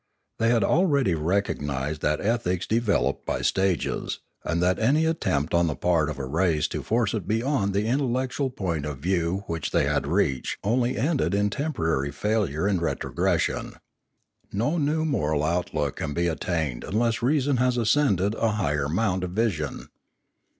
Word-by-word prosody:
They 115 0 +3
had 115 -3 +3
already 140 - +3
recognised 75 -4 -1
that 75 0 +1
ethics 100 -5 0
de 115 - +2
veloped 105 -4 0
by - - -2
stages, 95 -6 0 0.3
and 85 0 -1
that 90 +1 +2
any 145 +8 +3
attempt 95 - 0
on 85 0 +3
the 75 - -1
part 80 +2 +1
of 75 - -5
a 70 - -4
race 80 +1 +1
to - - -3
force 115 -2 0
it 105 -6 -3
beyond 115 -2 +1
the 100 +2 +1
intellectual 130 +2 0
point 85 - -3
of 75 -2 -5
view 90 +4 -1
which 80 -4 -3
they - - +2
had - - 0
reached 65 -3 0
only 120 +4 +1
ended 140 -4 +1
in 105 0 +1
temporary 80 - -1
fail 105 +6 0
ure 75 +6 -2
and 100 -4 +1
retrogression. 85 - -1 0.8
No 145 +12 0
new 155 +2 +1
moral 80 - 0
outlook 75 -3 -1
can 75 - -3
be 85 - +1
attained 80 -5 -2
unless 115 +3 0
reason 140 +1 +2
has 125 0 +2
ascended 110 - +2
a 115 -1 0
higher 75 -8 0
mouut 95 +1 0
of 90 -1 -4
vision. 95 -9 -2
95 Hz, 165 wpm, -25 LUFS, 80-120 Hz, 0.8 s, They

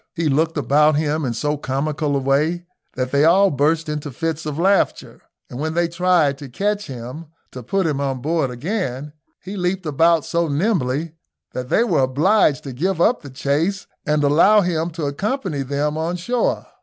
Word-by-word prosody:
He 165 -3 0
looked 160 +4 +1
about 150 +3 +3
him 155 +1 0
in 120 -2 -2
so 150 +5 -1
comical 145 +2 -2
a - - +1
way 150 +6 0 0.3
that 130 0 -2
they 140 +1 +3
all 190 +5 +5
burst 155 +3 +1
into 150 -1 -4
fits 160 +3 -3
of 150 -1 -4
laughter, 195 +4 +1 0.3
and 125 - -8
when 160 +2 -2
they 170 0 +2
tried 170 -5 +2
to 140 -3 -9
catch 205 +9 -2
him 130 +5 -8 0.2
to 125 - -8
put 190 +10 -1
him 145 -3 -1
on 135 -2 -2
board 155 +1 0
again, 145 - -4 0.3
he 190 +3 -7
leaped 180 0 -2
about 160 +2 +3
so 170 0 0
nimbly, 150 - 0 0.4
that 125 0 -5
they 230 - +3
were 235 - +1
obliged 145 +3 +2
to 135 - -7
give 175 +7 -1
up 235 +8 +3
the 145 - -10
chase 145 +9 -1 0.2
and 150 -1 +1
allow 170 +9 +5
him 170 -2 -1
to 165 -2 -5
accompany 190 - -2
them 145 +3 -2
on 165 +2 -1
shore. 235 +8 -1
155 Hz, 185 wpm, -20 LUFS, 140-175 Hz, 0.4 s, all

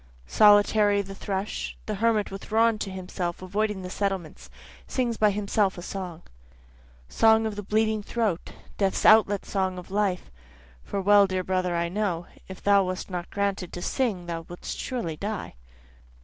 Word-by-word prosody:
Solitary 205 - +5
the 195 0 -9
thrush, 195 +1 -4
The 215 - -3
hermit 215 0 +1
withdrawn 220 +3 +1
to 200 - -3
himself, 180 -1 -5
avoiding 205 +1 -1
the 180 - -6
settlements, 185 - -3 0.4
Sings 240 -3 -1
by 215 -1 +4
himself 200 -1 0
a 175 - -7
song. 180 -4 -6 0.8
Song 220 - +4
of 215 -2 -3
the 205 - -4
bleeding 215 +1 +1
throat, 210 -5 -2 0.3
Death's 195 -2 +1
outlet 205 -2 +5
song 190 -2 -1
of 180 +1 -10
life, 200 -3 -1 0.5
(for 200 - -3
well 200 +1 +5
dear 185 -1 -2
brother 185 -1 0
I 170 0 0
know, 180 -2 -2 0.2
If 190 -1 -10
thou 200 -1 +5
wast 185 +1 -5
not 175 -1 -4
granted 200 -3 -2
to 175 - -5
sing 215 -10 -1
thou 170 -1 -4
wouldst 175 - -6
surely 175 -12 -3
die.) 205 +2 -4
200 Hz, 160 wpm, -26 LUFS, 185-210 Hz, 0.8 s, Solitary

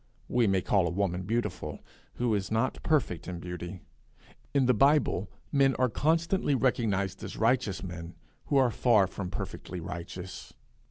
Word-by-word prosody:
We 120 -2 +2
may 95 -2 +2
call 95 -4 +3
a - - 0
woman 90 0 -1
beautiful 105 -9 -2 0.4
who 120 -2 +1
is 100 -3 -1
not 115 +4 0
perfect 140 - 0
in 90 -1 -4
beauty; 90 +1 -6 0.7
in 140 -2 +3
the 125 - +5
Bible 135 - +3 0.2
men 135 -1 +4
are 130 -1 +2
constantly 165 - +1
recognized 100 -7 0
as - - -6
righteous 115 -3 +1
men 85 -2 -7 0.3
who 140 - +1
are 130 -3 +4
far 110 -4 +4
from 95 0 -5
perfectly 90 - -6
righteous. 90 +1 -7
100 Hz, 155 wpm, -29 LUFS, 90-130 Hz, 0.7 s, the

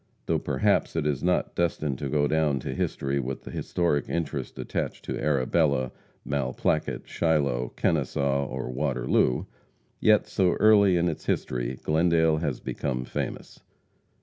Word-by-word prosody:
Though - - +1
perhaps - - +1
it 80 -3 0
is 70 -3 0
not 90 +2 +1
destined 80 -6 -1
to 70 - -3
go 75 +1 +2
down 75 -3 +1
to - - -4
history 70 +1 -1
with 65 0 -4
the - - -8
historic 85 -6 -1
interest 85 -1 -3
attached - - -4
to - - -3
Arbela, 70 -2 +1 0.3
Malplaquet, 70 +2 -1
Shiloh, 70 -7 0
Kennesaw 70 -2 0
or 65 -1 -4
Waterloo, 65 -2 +1 0.5
yet 110 -1 +4
so 90 -2 +2
early 100 -4 +5
in 85 +1 +2
its 80 -1 -4
history 60 0 -1
Glendale 80 0 +3
has 75 -5 -2
become 65 -3 -3
famous. - - -5
75 Hz, 140 wpm, -26 LUFS, 65-80 Hz, 0.5 s, early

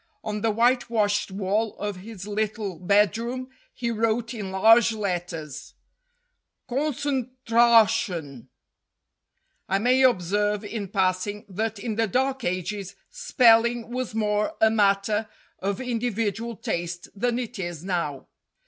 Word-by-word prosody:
On 210 -1 -3
the 225 - +1
whitewashed 230 -3 +1
wall 200 +3 -1
of 205 -2 -4
his 195 0 -9
little 210 -3 -3
bedroom 225 +7 +1 0.2
he 235 -1 -3
wrote 230 +1 0
in 210 -5 -5
large 225 +4 +5
letters 175 -7 -4 0.9
"CONCENTRASHUN." 235 - +1 1.2
I 195 - +2
may 250 +5 +3
ob 240 -9 +4
serve 205 +3 0
in 205 -1 -4
passing 190 +2 -1
that 220 +3 -2
in 215 +1 -4
the 225 0 +2
Dark 265 +4 0
Ages 185 +2 -3 0.2
spelling 235 - +3
was 250 -3 -4
more 210 +6 0
a 220 0 +5
matter 210 +1 +2 0.3
of 195 +1 -2
individual 230 -2 -2
taste 175 -2 -4
than 240 +3 0
it 245 -3 -5
is 175 -3 -5
now. 170 -7 -2
215 Hz, 120 wpm, -25 LUFS, 195-235 Hz, 1.2 s, large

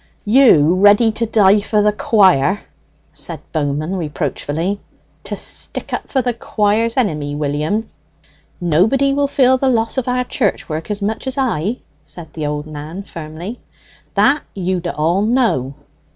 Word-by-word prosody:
"You, 210 - +5
ready 205 +4 +5
to 230 +1 -2
die 210 -2 +4
for 210 0 +1
the 210 - +4
quire," 195 -4 +3 0.5
said - - -6
Bowman 155 +3 -1
reproachfully, 160 +3 -3 0.5
"to - - -3
stick - - -4
up - - -4
for 265 -2 +1
the 245 0 0
quire's 225 +1 0
enemy, 150 - 0
William!" 150 +9 -1 0.7
"Nobody 210 - +2
will 285 0 +1
feel 260 -2 +3
the 270 - +2
loss 230 +1 +1
of 255 - -5
our 250 0 +1
church 235 -5 -1
work 160 0 -4
so 205 -1 -3
much 220 +5 -3
as 265 +1 -3
I," 230 - -1 0.2
said 165 -3 -11
the 155 -2 -3
old 150 0 -3
man 155 +5 -7
firmly; 165 +6 -8 0.6
"that 290 +1 +3
you 185 -1 -1
d'all 170 +1 0
know. 215 - +1
200 Hz, 150 wpm, -18 LUFS, 155-230 Hz, 0.7 s, You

